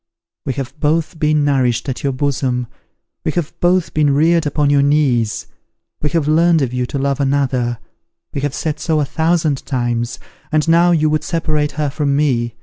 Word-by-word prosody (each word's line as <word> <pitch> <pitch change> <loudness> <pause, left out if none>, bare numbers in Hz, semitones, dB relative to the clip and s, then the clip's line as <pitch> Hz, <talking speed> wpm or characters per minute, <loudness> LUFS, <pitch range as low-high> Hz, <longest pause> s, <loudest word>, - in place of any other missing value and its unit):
We 135 - 0
have 135 +3 -6
both 160 +2 0
been 150 -1 +2
nourished 130 -4 +1
at 130 - -3
your 140 - 0
bosom; 130 -2 -1 0.6
we 155 - -1
have 170 -4 -2
both 180 0 +1
been 145 -2 +2
reared 165 +1 +3
upon 145 0 +1
your 140 -1 +4
knees; 140 -7 +1 0.6
we 150 - 0
have 155 -1 0
learnt 165 0 +3
of 125 -2 -3
you 125 -1 -1
to 140 - -4
love 140 0 -1
another; 135 -4 0 0.6
we 140 - -3
have 145 -1 -2
said 150 -2 -3
so 160 -2 0
a 145 - +1
thousand 160 -2 0
times; 120 -2 -2 0.3
and 155 0 +1
now 170 +2 +5
you 160 -3 +3
would 155 - 0
separate 155 -3 -1
her 150 -2 -1
from 145 -1 0
me! 120 -6 0
145 Hz, 185 wpm, -17 LUFS, 135-155 Hz, 0.6 s, now